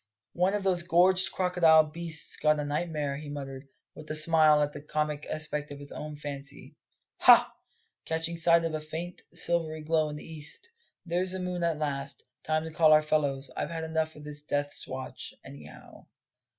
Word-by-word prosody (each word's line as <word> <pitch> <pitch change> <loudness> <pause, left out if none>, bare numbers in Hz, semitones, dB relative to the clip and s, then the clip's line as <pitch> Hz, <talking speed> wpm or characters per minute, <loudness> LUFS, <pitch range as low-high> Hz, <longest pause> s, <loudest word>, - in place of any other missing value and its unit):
"One 185 +3 +2
of 205 - -2
those 185 -2 +1
gorged 180 +2 +3
crocodile 175 -4 +5
beasts 160 0 -3
got 150 0 +2
a 150 - -2
nightmare," 150 -2 -2
he 150 0 -8
muttered, 135 -1 -7 0.3
with 155 - -11
a 155 - 0
smile 155 -1 +5
at 145 0 -3
the 145 - -8
comic 150 0 -2
aspect 150 -1 -2
of 145 - -8
his 145 0 -11
own 150 0 -6
fancy. 140 -1 -8 0.4
"Ha," - - +7 0.5
catching 165 +1 -2
sight 170 0 +4
of 165 - -2
a 155 - -2
faint, 165 +3 -6
silvery 165 -2 0
glow 155 0 +1
in 150 - -6
the 150 - -9
east, 155 - -8 0.4
"there's 180 +2 +1
the 190 - -3
moon 180 -1 -3
at 165 -2 +1
last. 140 -2 -4 0.2
Time 155 0 0
to 160 - -6
call 155 -1 +5
our 155 0 +6
fellows; 145 -3 0
I've - - -3
had 165 -1 -4
enough 160 0 -2
of 150 - -12
this 150 0 -6
death's 145 -1 -3
watch, 130 0 -6
anyhow." 75 +2 -13
155 Hz, 185 wpm, -29 LUFS, 150-165 Hz, 0.5 s, Ha